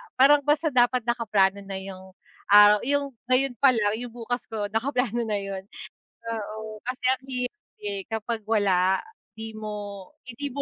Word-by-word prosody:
parang 280 +3 +6
basta 295 +2 +2
dapat 245 -1 +3
nakaplano 210 -5 +1
na 195 0 -7
yung 190 -1 -10 0.3
araw 205 0 +8
yung 285 0 0 0.2
ngayon 255 +1 +2
palang, 230 -7 +4
yung 245 -1 -7
bukas 245 +1 -4
ko, 210 -2 -4
nakaplano 240 0 0
na 210 - 0
yun. 195 -1 -4 0.6
Oo, 220 -1 -5
kasi 255 +2 -4
ang 260 0 -7
hirap, 250 +10 -3 0.2
eh, 400 -1 -2
kapag 225 +1 -3
wala, 190 -4 +3 0.4
'di 220 0 -7
mo 205 -3 -7 0.2
hindi 255 +3 -5
mo 280 +2 -4
225 Hz, 155 wpm, -25 LUFS, 205-255 Hz, 0.6 s, araw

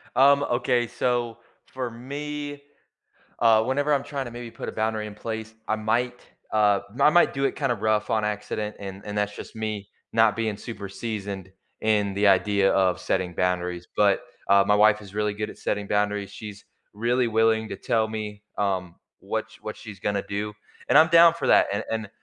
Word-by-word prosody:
Um, 140 +2 +6
okay, 120 -1 +1
so, 120 -1 -1 0.3
for 130 -2 -5
me, 145 +4 -6 0.8
uh, 110 -1 +5
whenever 145 +4 +1
I'm 140 -1 +1
trying 140 -2 -4
to 120 - -7
maybe 120 -1 -8
put - - -6
a - - -5
boundary 110 0 -1
in 105 - -10
place, 110 0 -5
I 110 - +1
might, 120 +3 -1 0.3
uh, 105 -2 +4
my 140 +3 +5
might 175 +3 +4
do 135 0 0
it - - 0
kinda 135 -4 0
rough 110 0 0
on 110 -1 +1
accident 105 0 -3
and 100 0 -8
and 105 0 -4
that's 105 0 -1
just - - -9
me 105 -2 -4 0.2
not 110 -2 +4
being 110 -2 -1
super 105 -2 -7
seasoned 100 -3 -5 0.3
in 105 -2 +2
the 100 +1 +2
idea 100 0 +4
of 95 -2 +2
setting 90 -1 -1
boundaries, 90 -1 -1
but, 100 -2 +4 0.3
uh, 100 0 +6
my 105 - +4
wife 105 0 +5
is 100 -2 -12
really 105 -1 0
good 105 +1 -4
at - - -11
setting 105 -1 -2
boundaries, 105 -1 0
she's 105 -1 -9 0.3
really 120 +4 +1
willing 110 0 +2
to - - -4
tell 110 -1 0
me, 105 -1 -6
um, 95 -4 -1 0.2
what - - -3
sh - - -15
what - - -6
she's 105 -3 -10
gonna 100 0 -1
do. 105 +1 -3 0.4
And - - +6
I'm 160 +1 +8
down 170 0 +8
for 170 - -3
that - - +6
and 100 - -1
and, 110 -2 -3
110 Hz, 195 wpm, -25 LUFS, 100-120 Hz, 0.8 s, I'm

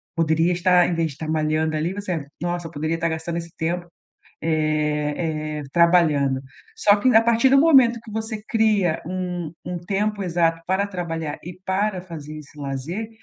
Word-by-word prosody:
poderia 165 +1 +2
estar, 180 0 +4
ao - - +1
invés 165 -3 -1
de, 155 +3 -7
malhando, 155 0 0
ali, 165 +4 -1
você: 185 -7 -4 0.2
"Nossa, 175 -1 -2
eu - - -12
poderia 155 +1 -2
estar 165 0 -1
gastando 160 +1 -3
esse 170 0 -6
tempo, 175 +2 -2 0.5
eh 155 0 -1
eh, - - -6
trabalhando." 160 -6 +3 0.4
Só 205 - +5
que, 210 +5 +1
a 225 - +7
partir 235 +3 +4
do 275 +1 +5
momento 265 -6 +6
que 225 - -12
você 220 0 -4
cria 210 -7 +2
um 180 -2 -3
um 180 0 -4
tempo 200 +3 -1
exato 165 -2 +1
para 190 +2 +1
trabalhar 165 -5 -4
e 175 +1 -9
para 190 0 0
fazer 155 -4 -8
esse 150 0 -14
lazer, 145 +10 -4
170 Hz, 170 wpm, -23 LUFS, 155-190 Hz, 0.5 s, a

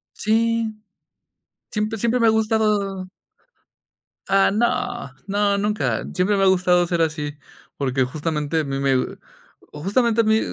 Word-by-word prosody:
Sí. 225 +1 +1 1.0
Siempre 215 +1 -2
siempre 235 +3 +1
me 230 - +4
ha - - +6
gustado 210 -4 0 1.2
Ah, 195 0 +4
no. 240 - -1 0.2
No, 200 0 +1
nunca. 210 +1 -1
Siempre 190 +3 +1
me 195 - +2
ha - - +5
gustado 180 -1 +3
ser 170 -1 0
así, 150 -2 -2 0.4
porque 130 -1 0
justamente 150 +3 -2
a - - 0
mí 135 -1 -3
me 135 -2 0 0.5
justamente 220 +9 +1
a - - 0
mí 220 0 +3
200 Hz, 135 wpm, -22 LUFS, 160-220 Hz, 1.2 s, ha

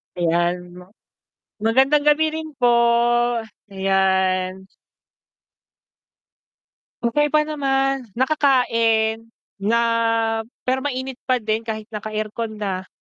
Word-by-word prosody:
Ayan, 175 +1 +1 0.2
ma 180 - -12 0.8
magandang 265 +6 +3
gabi 300 +1 +4
rin 315 0 -6
po, 245 -3 +2 1.0
ayan. 190 -1 0 2.4
Okey 295 +6 +2
pa 305 +1 +2
naman, 270 -3 -1
nakakain 230 -5 +2 0.3
na 220 +4 +1 0.8
pero 255 +1 0
mainit 260 -2 -4
pa 255 - +3
din 220 -2 -1
kahit 220 -1 -5
naka-aircon 215 +1 -4
na. 190 -3 -4
230 Hz, 90 wpm, -21 LUFS, 195-270 Hz, 2.4 s, gabi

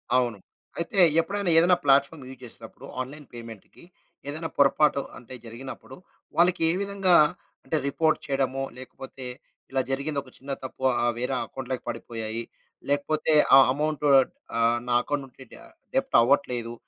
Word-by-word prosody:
అవును. 120 -4 +1 0.4
అయితే 180 +4 -2 0.2
ఎప్పుడైనా 195 +2 -1
ఏదైనా 175 +2 +6
ప్లాట్‌ఫామ్ 140 +1 +2
యూజ్ 130 -1 -11
చేస్తునప్పుడు, 115 +2 -11 0.2
ఆన్‌లైన్ 145 +3 -8
పేమెంట్‌కి 115 - -11 0.4
ఏదైనా 160 +3 -4
పొరపాటు 140 0 +3 0.2
అంటే 125 +1 -12
జరిగినప్పుడు, 130 +3 -9 0.4
వాళ్ళకే 170 -1 +3
విధంగా, 195 -2 +2 0.5
అంటే 160 - -1
రిపోర్ట్ 155 +3 +1
చేయడమో 135 -1 -1
లేకపోతే, 130 0 -10 0.5
ఇలా 135 - +1
జరిగిందొక 140 0 -3
చిన్న 140 +1 -8
తప్పు. 130 0 -8 0.2
ఆ - - +2
వేరే 125 +2 -1
అకౌంట్‌లోకి 130 +1 -6
పడిపోయాయి. 115 0 -5 0.5
లేకపోతే 150 +2 +1 0.2
ఆ - - +10 0.2
అమౌంట్ 150 0 -2 0.6
ఆహ్, 115 +1 +3
నా 120 - 0
అకౌంట్ 145 +1 -3
నుంచి 130 +1 -15
డా - - -13 0.3
డెబ్ట్ 270 0 0
అవ్వట్లేదు. 120 -2 +1
135 Hz, 130 wpm, -26 LUFS, 125-155 Hz, 0.6 s, ఆ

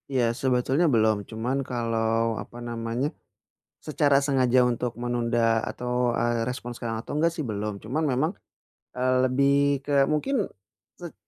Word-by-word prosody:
Iya 130 -3 +1 0.2
sebetulnya 130 +5 +2
belum, 110 -1 +4
cuman 120 +4 -2
kalau 115 -1 0
apa 110 +4 -11
namanya, 115 +3 -2 0.8
secara 145 -2 +3
sengaja 130 -3 +2
untuk 120 0 -2
menunda 120 -1 0 0.3
atau, 125 0 -5 0.3
eee, 120 -1 0
respons 120 -1 -5
sekarang 115 -1 -3
atau - - -8
enggak 165 +2 +2
sih 155 - -2
belum. 105 0 -3
Cuman 135 +9 -1
memang, 140 +6 +1 0.7
eee, 130 0 +2
lebih 135 +2 +3 0.3
ke 145 - -4 0.2
mungkin, 270 - 0 0.6
set 175 -3 -8
125 Hz, 140 wpm, -26 LUFS, 115-135 Hz, 0.8 s, belum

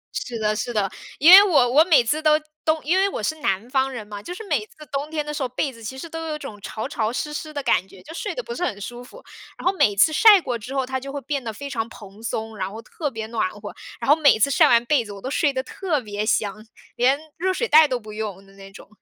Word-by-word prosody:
是 240 -2 -4
的， 215 -1 0
是 240 +3 -3
的， 205 -4 0 0.3
因 320 +5 +7
为 395 +2 +12
我 290 -11 +3
我 305 - +7
每 310 -9 +5
次 300 +7 -1
都 305 0 +4 0.2
冬 315 0 +1
因 335 +6 +1
为 390 +1 +3
我 - - -5
是 315 - -1
南 195 +4 -1
方 265 0 +1
人 225 -5 -7
嘛， 205 -1 -8
就 350 - -9
是 445 - -8
每 295 - +1
次 - - -24 0.2
冬 285 +2 -3
天 305 -2 -3
的 300 - -5
时 290 - -4
候， 255 - -1
被 260 +2 -2
子 230 - -14
其 260 +5 -6
实 300 - -7
都 325 0 -6
有 305 -1 -3
种 220 -8 -9
潮 215 - -5
潮 220 -1 -2
湿 300 +4 -4
湿 310 +1 -5
的 290 - -4
感 185 - +2
觉， 190 -2 -16
就 320 - -11
睡 - - -4
得 - - -4
不 475 - -6
是 355 - -4
很 205 - -2
舒 240 +4 -7
服， - - -14 0.3
然 - - -10
后 380 - +3
每 205 - +3
次 310 +10 +4
晒 425 +3 +7
过 250 -8 -3
之 245 +5 -8
后， 265 -1 0
它 260 0 -3
就 275 +1 -8
会 285 - -4
变 280 0 -3
得 225 - -4
非 280 +6 -8
常 230 -4 -3
蓬 205 -2 -13
松， 225 -1 -4
然 190 -2 -3
后 220 - -8
特 295 +3 -5
别 225 -3 -6
暖 220 -5 -1
和， 205 +1 -9 0.3
然 230 - -5
后 295 - +8
每 295 -7 +4
次 280 +6 +2
晒 - - +5
完 235 0 +4
被 275 -2 +2
子， 210 - -10
我 200 - -10
都 260 - -5
睡 285 -1 +2
得 260 -1 -3
特 325 0 -2
别 210 -3 -4
香， 215 -1 -1 0.3
连 255 +3 +3 0.2
热 375 +3 0
水 470 +5 -1
袋 310 -3 +7
都 255 -2 -2
不 215 -2 -11
用 205 -3 -6
的 195 - -20
那 195 0 -13
种。 - - -14
255 Hz, 310 characters per minute, -23 LUFS, 215-305 Hz, 0.3 s, 为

